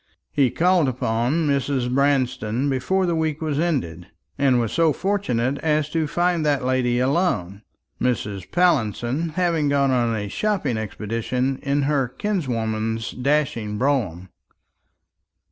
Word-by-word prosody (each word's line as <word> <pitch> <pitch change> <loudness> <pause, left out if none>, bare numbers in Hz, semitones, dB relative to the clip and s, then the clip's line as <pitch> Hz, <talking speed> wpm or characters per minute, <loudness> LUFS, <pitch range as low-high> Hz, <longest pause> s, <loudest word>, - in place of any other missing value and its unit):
He 140 -3 +3
called 175 +1 +2
upon 125 +6 0
Mrs. 140 -3 0
Branston 130 -2 +1
before 185 +9 0
the 175 - 0
week 160 -2 -1
was 155 -3 -2
ended, 95 - -2 0.3
and 130 -3 +3
was 115 -3 -1
so 165 -2 +3
fortunate 140 - -1
as 150 -1 0
to 160 -2 0
find 175 +1 +1
that 145 -4 +1
lady 125 -2 +1
alone; 125 - 0 0.4
Mrs. 105 -6 -2
Pallinson 150 - +1
having 170 -5 +1
gone 140 -1 +2
on 120 -3 +1
a 105 -1 -3
shopping 185 - -1
expedition 115 +5 -2
in 140 +1 0
her 140 -2 +1
kinswoman's 115 - -2
dashing 125 -6 -1
brougham. 105 - -1
135 Hz, 130 wpm, -22 LUFS, 115-155 Hz, 0.4 s, He